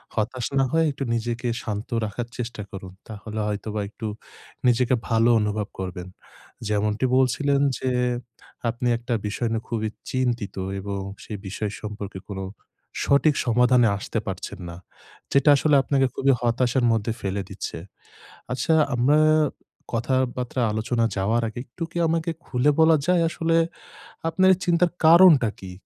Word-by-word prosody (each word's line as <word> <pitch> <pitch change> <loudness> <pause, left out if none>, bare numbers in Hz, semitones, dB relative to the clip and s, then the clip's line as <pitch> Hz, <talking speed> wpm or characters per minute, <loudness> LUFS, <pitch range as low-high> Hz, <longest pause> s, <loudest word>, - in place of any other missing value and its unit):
হতাশ 120 +3 -1
না 135 - +4
হয়ে 160 0 +3
একটু 135 0 -5
নিজেকে 120 +1 -2 0.2
শান্ত 105 +4 -4 0.2
রাখার 115 +3 -4
চেষ্টা 115 -3 -5
করুন। 95 -1 -8
তাহলে 110 0 -7
হয়তোবা 105 0 -3
একটু 110 0 -6 0.6
নিজেকে 125 +1 +3
ভালো 115 +1 +3
অনুভব 105 -1 -1
করবেন। 90 -1 -5 0.6
যেমনটি 105 +3 0
বলছিলেন 140 +2 +2 0.2
যে 130 - -1 0.8
আপনি 120 +2 -2
একটা 120 +1 -4
বিষয় 115 +2 -2
নিয়ে 115 +1 -2
খুবই 110 -2 -1 0.2
চিন্তিত 120 -5 -1 0.2
এবং 100 0 -4 0.3
সেই 105 - -6
বিষয় 100 +2 -3
সম্পর্কে 105 -2 -6
কোন 95 - -5 0.6
সঠিক 140 +1 +3
সমাধানে 125 0 +4
আসতে 100 - -3
পারছেন - - -5
না, 85 - -8 0.6
যেটা 140 +1 +4
আসলে 150 +1 +3
আপনাকে 135 -2 +2
খুবই 135 0 +3
হতাশার 120 +1 +1
মধ্যে 110 +1 -1
ফেলে 100 0 -2
দিচ্ছে। 95 -3 -6 0.8
আচ্ছা, 160 +5 +1 0.2
আমরা 140 +5 +4 0.8
কথাবার্তা 125 +1 -1
আলোচনা 115 +2 0
যাওয়ার 110 +5 +1
আগে 110 - -8
একটু 130 +8 -10
কি - - -13
আমাকে 165 +1 0
খুলে 130 +3 +2
বলা 160 0 +6
যায় 180 -1 +3
আসলে 165 -1 0 0.7
আপনার 185 +3 +3
এই 180 - -17
চিন্তার 175 0 +3
কারণটা 160 -8 +7
কি? 95 -1 -8
120 Hz, 140 wpm, -24 LUFS, 105-135 Hz, 0.8 s, কারণটা